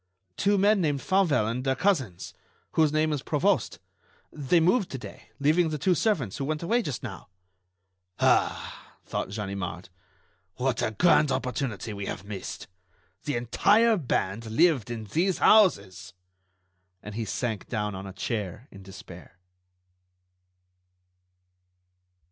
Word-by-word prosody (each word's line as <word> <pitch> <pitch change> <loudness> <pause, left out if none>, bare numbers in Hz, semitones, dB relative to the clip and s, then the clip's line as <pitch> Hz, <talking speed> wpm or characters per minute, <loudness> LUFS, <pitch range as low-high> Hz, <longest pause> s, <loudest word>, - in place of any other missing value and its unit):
"Two 200 0 +2
men 200 +1 +3
named 145 -4 0
Fauvel 175 - +2
and 120 +4 -2
their 135 0 +1
cousins, 130 - -1 0.4
whose 155 -2 +3
name 155 0 +1
is 145 - -2
Provost. 160 - 0 0.6
They 150 +3 +2
moved 185 +5 +2
to 135 - -5
day, 105 -2 -11
leaving 160 +4 +3
the 155 - -3
two 180 +6 +2
servants, 160 - 0
who 135 - -3
went 155 +2 -3
away 235 +8 +2
just 145 - -5
now." 110 -6 -8 0.9
"Ah!" - - 0
thought - - -3
Ganimard; 100 -3 -5 0.7
"what 125 -2 -1
a - - +1
grand 150 +3 +3
opportunity 120 - -3
we 100 -1 -5
have 90 - -6
missed! 100 -3 -7 0.6
The 145 - -1
entire 205 - +3
band 115 - -2
lived 135 - +2
in 115 -2 -5
these 170 - 0
houses." 95 - +3 0.9
And 105 - -8
he 115 +2 -3
sank 110 0 -3
down 105 -3 -2
on 95 +1 -7
a - - -7
chair 105 +3 -4
in 100 - -12
despair. 90 -2 -12
130 Hz, 135 wpm, -27 LUFS, 105-165 Hz, 0.9 s, men